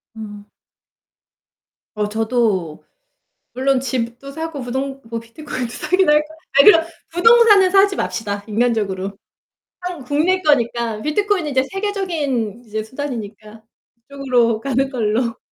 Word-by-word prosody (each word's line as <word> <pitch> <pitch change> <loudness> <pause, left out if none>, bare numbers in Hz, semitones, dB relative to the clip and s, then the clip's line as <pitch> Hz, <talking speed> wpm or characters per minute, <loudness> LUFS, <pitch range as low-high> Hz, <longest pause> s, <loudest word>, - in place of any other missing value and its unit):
음. 210 -2 -9 1.5
어 210 -1 -1
저도 220 -7 -1 0.7
물론 265 +1 +1
집도 245 +1 -4
사고 320 -1 -5
부동 265 +2 -4
뭐 230 0 -5
비트코인도 245 +1 -6
사긴 370 +5 +1
할 300 - +6
거야. 315 +1 -15 0.2
아 - - +9
그냥 330 -5 +7 0.2
부동산은 415 +1 +6
사지 390 0 +4
맙시다 205 -2 -3
인간적으로. 205 -4 -1 0.6
한국 355 -8 -7
국내 330 +7 +1
거니까. 235 -7 +1
비트코인은 365 - 0
인제 260 -2 +2
세계적인 320 - -2
이제 215 0 -4
수단이니까 220 -4 -7 0.5
이쪽으로 250 -5 +1
가는 270 +2 0
걸로 235 -1 -1
255 Hz, 280 characters per minute, -19 LUFS, 225-310 Hz, 1.5 s, 아